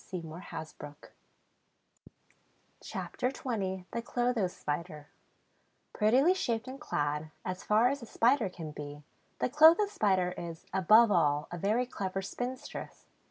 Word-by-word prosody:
CHAPTER 250 - -3
XX 195 -9 -3
THE 235 - -2
CLOTHO 240 -4 0
SPIDER 150 -2 -5 0.8
Prettily 255 +11 +4
shaped 235 -10 -2
and 265 +3 -8
clad, 150 - -2 0.2
as 185 0 -4
far 215 +3 +4
as 280 0 -3
a 235 - -9
Spider 240 -2 +2
can 165 -4 -8
be, 145 0 -8 0.3
the - - 0
Clotho 315 - +7
Spider 195 - +1
is, 165 -1 -7
above 215 +4 +6
all, 150 -5 +2
a 175 - -5
very 215 +7 +1
clever 195 -5 -4
spinstress. 255 +7 -6
210 Hz, 115 wpm, -31 LUFS, 175-250 Hz, 0.8 s, Clotho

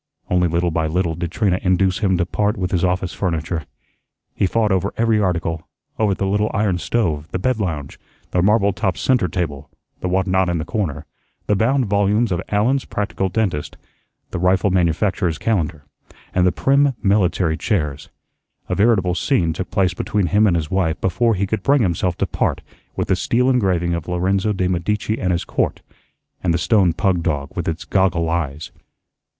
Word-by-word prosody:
Only 90 -1 +3
little 85 +1 0
by 80 0 0
little 85 +1 0
did 85 +1 -4
Trina 95 -2 +1
induce 95 0 +2
him 95 -4 +2
to 85 - +1
part 105 +4 -1
with 90 -2 -2
his 90 -1 0
office 90 0 0
furniture. 85 -3 -2 0.7
He 95 - +1
fought 110 +1 +1
over 95 +1 0
every 115 -1 +2
article, 85 -4 -1 0.3
over 105 -3 +2
the 100 - -2
little 105 +2 +1
iron 100 -4 +1
stove, 80 -9 -1
the - - -1
bed 120 +5 0
lounge, 80 -8 -4 0.3
the 90 - +2
marble 100 +1 +3
topped 95 -3 -1
centre 125 -8 +2
table, 75 -5 -4 0.3
the - - -3
whatnot 95 0 +1
in 85 - 0
the 80 - -3
corner, 80 - -3 0.4
the 105 - +2
bound 125 +6 +2
volumes 100 +2 +1
of 85 - 0
"Allen's 120 +7 +1
Practical 100 -2 -2
Dentist," 95 -7 -2 0.5
the - - -3
rifle 95 +2 +2
manufacturer's 90 0 +1
calendar, 80 -9 -1 0.5
and 90 0 +3
the - - +3
prim, 140 +3 +2
military 95 -5 +2
chairs. 75 -7 -2 0.6
A - - 0
veritable 100 -4 +3
scene 85 - +1
took 90 +3 -5
place 95 -2 +1
between 100 +2 -1
him 105 +4 +3
and 90 - +2
his 80 -3 -2
wife 90 -4 0
before 115 +5 +1
he 100 +1 0
could 110 +3 -2
bring 140 -3 +3
himself 90 -1 0
to - - +1
part - - -1 0.3
with - - -2
the 95 - +3
steel 125 +7 +1
engraving 90 -8 +1
of 85 -2 -4
"Lorenzo 95 +4 0
de' 95 -3 0
Medici 105 +5 -1
and 90 -3 +1
His 85 +1 -1
Court" - - -1 0.6
and 90 - +2
the - - +2
stone 90 +1 +3
pug 90 +1 0
dog 70 -4 -2
with - - -3
its 80 0 -3
goggle 90 -3 +1
eyes. 80 -2 -3
95 Hz, 185 wpm, -20 LUFS, 85-105 Hz, 0.7 s, Only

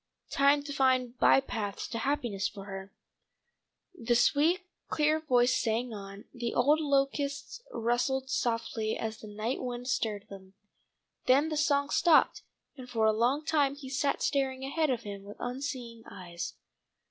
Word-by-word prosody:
Time 280 +1 +4
to 285 0 -6
find 255 -3 +2
bypaths 215 -7 +2
to 230 - -4
happiness 235 -7 -1
for 195 -2 -9
her 195 -1 -7 1.0
The 240 -9 0
sweet 305 +9 +3 0.3
clear 305 +1 +2
voice 250 -5 +3
sang 230 +1 -1
on, 195 -1 -9
the 240 -2 -3
old 290 +5 +4
locusts 280 +3 -1
rustled 245 - 0
softly 230 -3 -1
as 220 -1 -4
the 215 - -10
night 215 +5 -3
wind 245 -1 -5
stirred 220 -7 -1
them. 190 -1 -12 0.7
Then 280 +5 +4
the 310 - -2
song 290 -1 +2
stopped, 330 -3 +4 0.3
and 255 -2 -10
for 225 -3 +1
a 220 - +4
long 250 +7 +1
time 285 -4 +2
he 280 -2 -9
sat 280 +1 0
staring 265 -2 0
ahead 305 +3 0
of 240 -3 -1
him 200 -1 -7
with 205 +1 -11
unseeing 245 -2 -5
eyes. 175 -2 -7
250 Hz, 150 wpm, -30 LUFS, 220-280 Hz, 1.0 s, Time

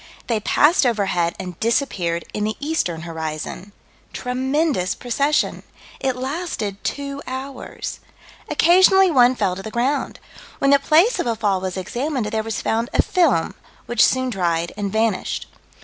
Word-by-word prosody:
They 230 -3 0
passed 295 - +3
overhead 195 -8 +1
and 180 -3 -7
disappeared 190 -8 0
in 210 - -2
the 215 0 -2
eastern 285 - -1
horizon. 160 +3 -5 0.4
Tremendous 260 - 0
procession. 280 +5 0 0.4
It 265 -2 0
lasted 255 - -4
two 280 0 -4
hours. 265 +1 -6 0.5
Occasionally 375 +2 +5
one 250 -3 +5
fell 195 -6 0
to 190 - -7
the 220 - -6
ground. 250 +6 -1 0.4
When 275 - +2
the 280 - +6
place 335 - +3
of - - -1
a 230 - +1
fall 205 -4 0
was 185 0 -4
examined, 250 - -2
there 220 -1 0
was 225 0 -4
found 230 +2 0
a - - +4
film, 320 - +2 0.3
which 240 - +3
soon 260 -1 +2
dried 170 -4 -1
and 200 -1 -3
vanished. 220 -2 0
235 Hz, 150 wpm, -21 LUFS, 195-280 Hz, 0.5 s, the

